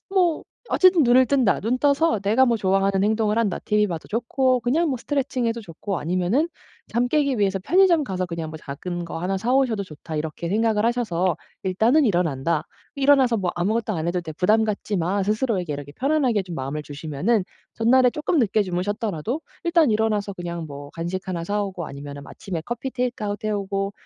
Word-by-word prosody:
뭐 360 -5 +2 0.2
어쨌든 370 -4 +5
'눈을 255 +1 +5
뜬다. 260 -7 +2
눈 240 +4 0
떠서 285 -4 +2
내가 220 +6 +3
뭐 235 -1 +2
좋아하는 195 -1 +1
행동을 215 0 +1
한다. 210 -5 0
TV 210 -1 +2
봐도 165 -3 -5
좋고 250 +3 +1
그냥 300 +8 +1
뭐 260 - 0
스트레칭 265 -2 -1
해도 230 0 -1
좋고 185 0 -5
아니면은 185 - 0 0.4
잠 240 +1 +2
깨기 280 -4 +1
위해서 195 -1 +1
편의점 350 - +4
가서 185 -4 -2
그냥 165 -2 -5
뭐 155 - -7
작은 175 +5 -5
거 165 - -6
하나 190 +3 -1
사 240 +5 -1
오셔도 240 -7 +2
좋다.' 160 -2 -9
이렇게 160 +2 -4
생각을 215 +1 +1
하셔서 190 -7 0 0.3
'일단은 225 +11 +3
일어난다. 165 - 0 0.3
일어나서 270 -4 +4
뭐 185 -3 -1
아무것도 215 +5 0
안 160 0 -2
해도 180 0 0
돼. 160 -2 -7
부담 215 +7 +3
갖지 210 -1 -2
마.' 185 +4 0
스스로에게 210 - 0
이렇게 145 0 -7
편안하게 260 - +1
좀 175 -2 -8
마음을 140 +3 -4
주시면은 155 +8 -1 0.3
전날에 250 +2 +4
쪼끔 300 +3 -1
늦게 215 -1 +2
주무셨더라도 205 - -2 0.2
일단 335 -6 +4
일어나서 210 -2 0
그냥 170 -2 -5
뭐 145 0 -9
간식 175 +3 -4
하나 170 -2 -2
사 205 +2 -1
오고 185 -4 -5
아니면은 140 0 -8
아침에 175 -5 -6
커피 240 +3 -4
테이크아웃 215 -5 -3
해 215 - 0
오고 195 -1 -2
205 Hz, 420 characters per minute, -23 LUFS, 175-245 Hz, 0.4 s, 어쨌든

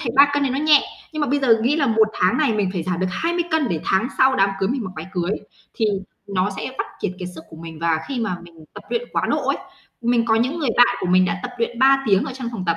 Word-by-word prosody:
thấy 235 - -2
3 285 +1 +8
cân 290 - +1
này 275 - +1
nó 265 - -1
nhẹ, 300 -1 +5 0.3
nhưng 310 - -4
mà 295 - +1
bây 285 +1 +2
giờ 230 -5 +3
nghĩ 280 +6 +2
là 285 - +2
một 220 -2 +3
tháng 185 +6 +2
này 280 -5 +2
mình 205 -3 0
phải 180 -4 -2
giảm 180 0 -2
được 185 - +1
20 340 - -1
cân 315 -6 +1
để 160 -3 -2
tháng 190 +6 +1
sau 265 0 +4
đám 195 -4 +3
cưới 190 - 0
mình 250 -3 -2
mặc 190 - -5
váy 160 +2 -6
cưới, 180 0 -1 0.4
thì 220 - +1 0.4
nó 195 0 0
sẽ 260 - -5
vắt - - -1
kiệt 185 - -2
kiệt 180 -1 -5
sức 160 0 -10
của 160 - -11
mình. 165 -1 -9
Và 165 -1 +1
khi 260 -4 -3
mà 215 -6 -1
mình 165 -2 -15
tập - - -9
luyện 475 0 0
quá - - 0
độ - - -1
ấy, - - +2 0.4
mình 235 -1 +2
có 225 -1 +2
những 260 +9 0
người 275 -7 0
bạn 245 - +5
của - - -2
mình 185 +1 +4
đã 180 - -1
tập 250 - -4
luyện 235 0 -2
3 270 +1 +5
tiếng 195 +3 +3
ở 270 - -5
trong 255 -2 -5
phòng 190 -5 -5
tập, 165 - +1
230 Hz, 300 wpm, -21 LUFS, 185-270 Hz, 0.4 s, 3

